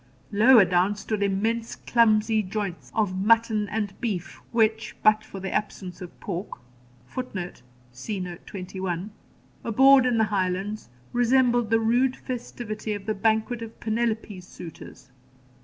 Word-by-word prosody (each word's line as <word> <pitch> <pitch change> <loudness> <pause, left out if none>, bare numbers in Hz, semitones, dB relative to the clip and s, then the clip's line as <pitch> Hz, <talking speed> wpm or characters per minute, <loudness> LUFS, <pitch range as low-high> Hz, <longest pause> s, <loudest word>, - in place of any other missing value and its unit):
Lower 220 +1 +7
down 185 +3 +2
stood 210 0 -3
immense 220 +4 0
clumsy 220 -1 +3
joints 195 -2 -5
of 195 -4 0
mutton 220 -1 +3
and 210 -3 -2
beef, 195 -8 -3
which, 220 -1 +1
but 215 0 +5
for 195 - -9
the 190 0 -4
absence 185 -4 -3
of 180 - -10
pork, 190 +1 -5 0.5
[Footnote: 185 - -6 0.3
See 190 - -5
Note 180 -1 -7
21.] 185 0 -4 0.5
abhorred 265 +3 +6
in 245 -2 +2
the 220 - +4
Highlands, 195 - -2 0.2
resembled 245 -1 +3
the 225 0 +4
rude 245 +3 +2
festivity 230 -3 -5
of 205 -1 -6
the 215 - 0
banquet 220 +3 0
of 230 0 -9
Penelope's 220 -4 -2
suitors. 165 -6 -11
215 Hz, 135 wpm, -25 LUFS, 190-230 Hz, 0.5 s, Lower